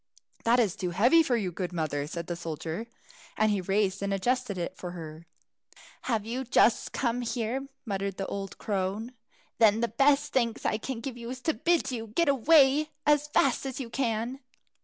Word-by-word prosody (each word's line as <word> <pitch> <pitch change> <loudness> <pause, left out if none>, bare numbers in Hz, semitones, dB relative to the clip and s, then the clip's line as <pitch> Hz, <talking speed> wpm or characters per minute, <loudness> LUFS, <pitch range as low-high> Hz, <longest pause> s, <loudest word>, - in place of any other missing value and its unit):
"That 235 +2 +4
is 210 -7 +2
too 180 - -3
heavy 240 - +5
for 255 -6 +1
you, 195 -5 -2
good 180 +1 -4
mother," 150 -4 -2
said 170 +2 -5
the 175 - -4
soldier; 165 +5 -5 0.5
and 215 0 +3
he 200 -2 0
raised 195 +1 0
and 200 0 -1
adjusted 240 +1 0
it 175 +1 -4
for 180 - -7
her. 160 -1 -9 0.8
"Have 220 -4 0
you 245 +4 -3
just 240 -2 +3
come 245 -1 -1
here?" 240 +3 -2 0.2
muttered 195 -2 -3
the 195 - -2
old 195 -1 -5
crone; 205 +3 -2 0.5
"then 220 -1 +5
the 235 - +2
best 280 +6 +2
thanks 235 -3 0
I 215 - +1
can 245 -1 -5
give 250 0 -5
you 235 0 -7
is 255 +1 -5
to 320 - +1
bid 340 -4 +1
you 225 -3 -4
get 305 +9 +1
away 280 +2 +5 0.2
as 295 0 +3
fast 275 -3 +2
as 260 0 -5
you 240 -4 -6
can." 240 0 -1
225 Hz, 190 wpm, -28 LUFS, 195-260 Hz, 0.8 s, heavy